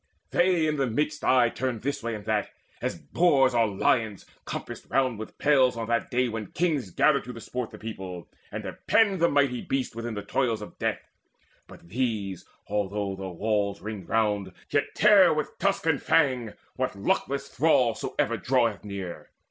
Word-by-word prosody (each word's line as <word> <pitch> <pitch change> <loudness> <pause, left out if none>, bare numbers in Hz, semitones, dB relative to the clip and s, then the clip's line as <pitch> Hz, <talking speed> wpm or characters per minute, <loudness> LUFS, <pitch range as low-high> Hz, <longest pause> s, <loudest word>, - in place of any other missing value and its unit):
They 175 -2 +3
in 155 -1 0
the 135 -2 +1
midst 150 +6 -1
aye 125 -2 +4
turned 125 -3 -3
this 140 +2 -2
way 115 0 -3
and 105 -1 -9
that, 110 -1 0 0.3
As - - -2
boars 135 - +3
or 115 -2 +3
lions 105 +1 0 0.2
compassed - - -6
round 130 -5 +1
with 110 - -8
pales 130 -4 +3
On 115 -1 -3
that 115 0 0
day 125 -1 +1
when 110 -3 -4
kings 150 - -1
gather 140 - +3
to 125 - -8
the 115 - -9
sport 125 +1 -4
The - - -11
people, 95 -5 -7 0.2
and - - -5
have - - -9
penned 200 -4 +4
the 170 +1 +4
mighty 140 -4 +2
beasts 135 -4 -2
Within 115 -1 -4
the 105 - -4
toils 120 -5 0
of - - -12
death; - - -2 0.6
but - - -15
these, 105 -6 -2 0.2
although 100 0 -1
With 95 0 -6 0.2
walls 100 -1 0
ringed 105 -4 -7
round, 105 -4 +1 0.2
yet 145 0 0
tear 195 -6 +6
with 150 -1 -4
tusk 195 -2 +1
and 160 -4 +2
fang 130 -8 +2 0.2
What 130 -2 -1
luckless 140 +7 -1
thrall 130 -6 +3
soever - - -1
draweth 120 -5 +1
near. 100 -4 -6
120 Hz, 180 wpm, -27 LUFS, 105-140 Hz, 0.6 s, tear